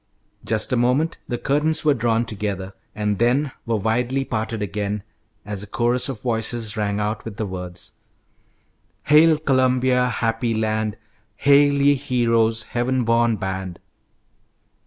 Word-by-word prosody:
Just 110 +3 -1
a - - +4
moment 125 +7 +1
the 120 - -2
curtains 155 +5 +1
were 150 - +5
drawn 115 -1 +1
together, 100 -3 -4 0.2
and 105 -2 -1
then 130 +5 +2 0.2
were 115 - +1
widely 125 +6 0
parted 110 -1 -3
again, 105 +1 -3 0.4
as 105 -1 -5
a 105 - -8
chorus 120 +5 +1
of 120 -6 -6
voices 115 -2 -2
rang 105 -1 -1
out 105 +1 -2
with 110 -3 -8
the 110 - -2
words: 90 -2 -7 1.1
"Hail, 155 +1 +5
Columbia, 130 -3 +2
happy 115 -1 -1
land; 110 -1 -1 0.4
Hail, 145 0 +5
ye 140 0 +4
heroes, 115 -5 +1
heaven 125 +2 -1
born 115 0 +2
band!" 95 -3 -5
115 Hz, 135 wpm, -22 LUFS, 105-130 Hz, 1.1 s, were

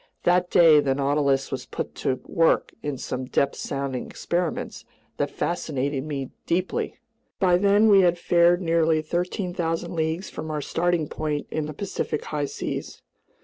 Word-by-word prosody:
That 180 0 +3
day 160 -3 +7
the 135 -2 +1
Nautilus 140 -1 +1
was 130 -2 -4
put - - -5
to 130 - -1
work 165 -1 +2
in 145 -2 -3
some 130 +1 -4
depth 140 +2 +1
sounding 135 -2 -3
experiments 175 -1 -3 0.3
that - - 0
fascinated 140 -5 -2
me 140 -4 -4 0.2
deeply. 180 +2 -1 0.4
By 180 -2 +4
then 205 +3 +4
we 200 -2 +7
had 175 -1 +3
fared 175 +1 +3
nearly 165 -2 +2
13,000 175 0 -2
leagues 160 +3 -1
from 160 - -7
our 155 -1 -2
starting 165 +2 0
point 150 -1 -3
in 155 -1 -2
the 155 - -6
Pacific 200 +3 -3
high 150 -1 -2
seas. - - -5
160 Hz, 150 wpm, -25 LUFS, 145-175 Hz, 0.4 s, day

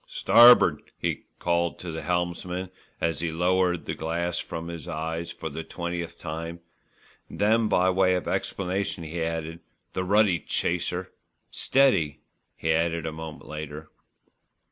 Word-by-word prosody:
"Starb'd," 120 +1 +6
he - - -2
called 85 -1 0
to 90 - -6
the 80 0 -5
helmsman 90 +2 -2 0.3
as 80 -3 0
he 85 0 -1
lowered 90 +1 +1
the - - -2
glass 85 +2 -2
from 85 0 -5
his 85 -3 -7
eyes 80 +2 -3
for - - -6
the 80 +1 -5
twentieth 85 0 -5
time, 85 +2 -5 0.7
then 110 +2 +2
by 90 -3 +3
way 95 0 +3
of 90 - -3
explanation 95 -2 -2
added, 80 0 -3 0.3
"The 95 - -1
ruddy 100 -2 +3
chaser." 90 +1 -1 0.4
"Steady," 130 - +2 0.3
he 80 - -1
added 85 0 +1
a 80 - -2
moment 80 0 -8
later. 75 0 -7
85 Hz, 135 wpm, -26 LUFS, 80-90 Hz, 0.7 s, Starb'd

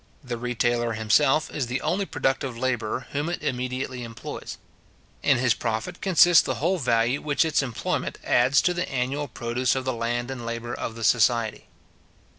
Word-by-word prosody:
The 125 -2 -4
retailer 120 0 0
himself 135 +8 +2
is 135 -5 -2
the 125 +2 -2
only 185 +6 0
productive 135 -3 -1
labourer 125 -1 -2
whom 145 +3 -2
it 175 - -4
immediately 125 0 -3
employs. 115 -1 -7 0.6
In - - +3
his 125 -2 +3
profit 115 +12 -3
consists 175 -3 +6
the - - -2
whole 180 +5 0
value 120 0 +1
which 150 +1 +1
its 155 -2 +2
employment 125 -5 -3
adds 130 +4 +3
to 180 - +2
the 180 +1 -3
annual 135 +3 -1
produce 125 0 -1
of 130 -1 -3
the 130 - 0
land 120 +2 -2
and 125 -3 -6
labour 115 +1 -4
of 115 - -4
the 115 - -7
society. 115 +1 +2
125 Hz, 170 wpm, -25 LUFS, 120-140 Hz, 0.6 s, consists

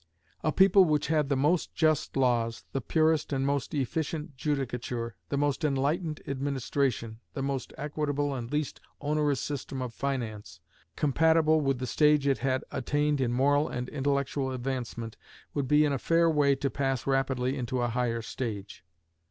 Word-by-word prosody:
A 155 - +2
people 190 +2 +6
which 150 -3 +1
had 150 -3 +2
the 140 - +2
most 150 +6 +1
just 155 -4 +1
laws, 120 -3 +1
the 135 - -2
purest 155 +4 +2
and 135 -1 0
most 140 0 -1
efficient 150 +2 -2
judicature, 125 -4 -2 0.2
the 140 - -1
most 145 +3 0
enlightened 150 +3 0
administration, 135 -4 -1 0.2
the 135 - -2
most 135 -2 -3
equitable 145 -1 -1
and 120 -3 -5
least 150 -1 -2 0.2
onerous 145 -2 +1
system 140 -1 -4
of 125 -2 -4
finance, 110 - -4 0.4
compatible 160 +2 +3
with 135 -2 +1
the 130 - -3
stage 150 +2 +3
it 140 -1 +2
had 130 -1 0
attained 145 +2 0
in 120 -2 +1
moral 145 +4 +2
and 125 0 -4
intellectual 140 -1 -1
advancement, 125 -3 -4 0.4
would 140 -3 -1
be 150 +2 +5
in 145 - +1
a 135 - -1
fair 165 +3 +3
way 145 -3 +3
to 135 0 -2
pass 135 -3 -1
rapidly 135 -1 +1
into 125 -1 -2
a 120 - +1
higher 115 -1 -1
stage. 105 -7 -5
140 Hz, 160 wpm, -29 LUFS, 125-150 Hz, 0.4 s, people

